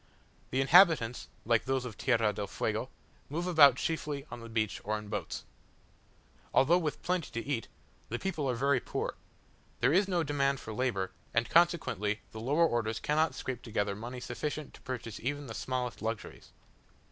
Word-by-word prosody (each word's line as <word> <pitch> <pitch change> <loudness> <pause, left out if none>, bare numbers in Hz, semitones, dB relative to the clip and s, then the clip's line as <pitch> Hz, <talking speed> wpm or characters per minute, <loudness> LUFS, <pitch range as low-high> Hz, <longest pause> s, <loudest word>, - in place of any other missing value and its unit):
The 130 - +1
inhabitants, 150 - +5 0.2
like 115 0 +2
those 130 -1 0
of 115 -5 -6
Tierra 115 -4 +2
del 100 - -4
Fuego, - - -2 0.4
move 165 +5 -2
about 150 -7 +7
chiefly 150 -1 -2
on - - -6
the 115 0 -9
beach 110 -2 -1
or 110 +1 -1
in 105 -1 -9
boats. 105 - -4 1.1
Although 165 +7 +5
with 155 -4 -3
plenty 180 -3 -1
to 115 - -5
eat, 130 -6 -1 0.4
the 120 - -2
people 155 -4 -2
are 125 - 0
very 135 +2 +2
poor: - - -3 0.7
there 125 +5 +3
is 190 +3 +4
no 175 -3 +1
demand 140 -2 +1
for 110 - -7
labour, 105 -6 -1 0.2
and 115 0 +1
consequently 115 - +2
the 110 - -7
lower 145 +8 +3
orders 115 -5 0
cannot 155 +2 +1
scrape 125 -2 -4
together 105 -3 -1
money 120 +4 -6
sufficient 150 +5 -4
to - - -15
purchase 120 -4 -5
even 145 +4 -3
the 115 - -7
smallest 125 0 -3
luxuries. 110 0 -5
130 Hz, 170 wpm, -31 LUFS, 115-150 Hz, 1.1 s, about